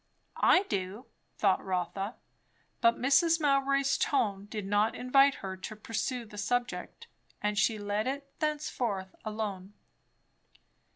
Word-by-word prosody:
I 370 - +5
do! 200 - -4 0.3
thought 195 -3 +2
Rotha; 190 +3 -2 0.7
but 230 0 +4
Mrs. 280 +6 +4
Mowbray's 275 -1 +2
tone 200 -8 +1
did 210 -1 -5
not 205 +3 +2
invite 270 +2 +4
her 190 0 -4
to 215 +4 -7
pursue 230 +3 -3
the 210 -1 -9
subject; 245 +4 -2 0.3
and 210 0 -1
she 220 +2 +2
let 205 +2 -1
it 275 +1 -3
thenceforth 245 -11 -2
alone. 210 -3 -4
220 Hz, 120 wpm, -30 LUFS, 200-275 Hz, 0.7 s, I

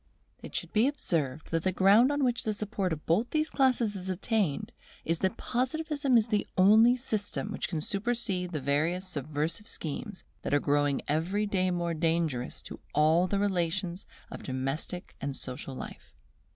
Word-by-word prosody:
It - - -9
should - - -3
be 220 +4 +4
observed 160 - -1
that 165 0 +1
the 185 - +1
ground 200 +8 +5
on 290 -1 0
which 245 -2 +1
the 215 -1 -1
support 205 -3 -2
of 155 -1 -4
both 205 +9 +2
these 310 0 0
classes 255 -6 +2
is 190 -1 -5
obtained 190 -3 0 0.3
is, 165 0 0
that 190 -1 0
Positivism 285 +1 0
is 225 0 +2
the 210 -2 +1
only 220 +6 +7
system 215 -4 -2
which - - -3
can 160 -4 -2
supersede 200 -2 -1
the 155 - -2
various 160 +7 0
subversive 155 - -3
schemes 185 +6 -5 0.2
that - - 0
are - - +4
growing 145 -1 +1
every 175 +8 0
day 185 -2 +1
more 175 -1 -1
dangerous 160 -6 -1
to - - -9 0.2
all 160 +4 +4
the 200 - 0
relations 185 -2 -1 0.2
of - - -7
domestic 135 +7 -4
and 140 0 -3
social 130 +1 -5
life. - - -9
185 Hz, 170 wpm, -29 LUFS, 160-220 Hz, 0.3 s, only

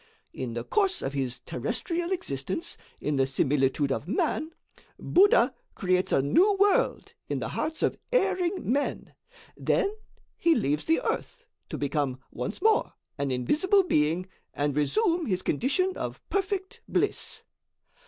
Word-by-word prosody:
In 120 -3 -5
the 120 - -3
course 385 - +1
of 135 - -2
his 130 -3 -2
terrestrial 335 - -2
existence 185 - -2 0.2
in 150 -1 -1
the 135 0 +3
similitude 135 +1 +1
of 135 - -2
man, 305 - 0 0.5
Buddha 345 -9 +4 0.2
creates 185 -1 +1
a 135 - +3
new 375 - +4
world 410 +5 +2 0.2
in - - -1
the - - -3
hearts 315 0 -2
of - - +1
erring 375 -7 +1
men; 285 +2 -1 0.4
then 400 - +1 0.5
he 335 -1 +4
leaves 150 - 0
the 325 +8 +2
earth, 485 -1 -3 0.2
to - - -4
become 140 -2 -1
once 125 - -5
more 440 0 +3 0.3
an 140 -1 0
invisible 310 - +3
being 165 - +1 0.3
and 145 -1 0
resume 335 - +1
his 185 -2 0
condition 285 - +1
of - - -6
perfect 395 +3 -2
bliss. - - -1
230 Hz, 140 wpm, -27 LUFS, -, 0.5 s, Buddha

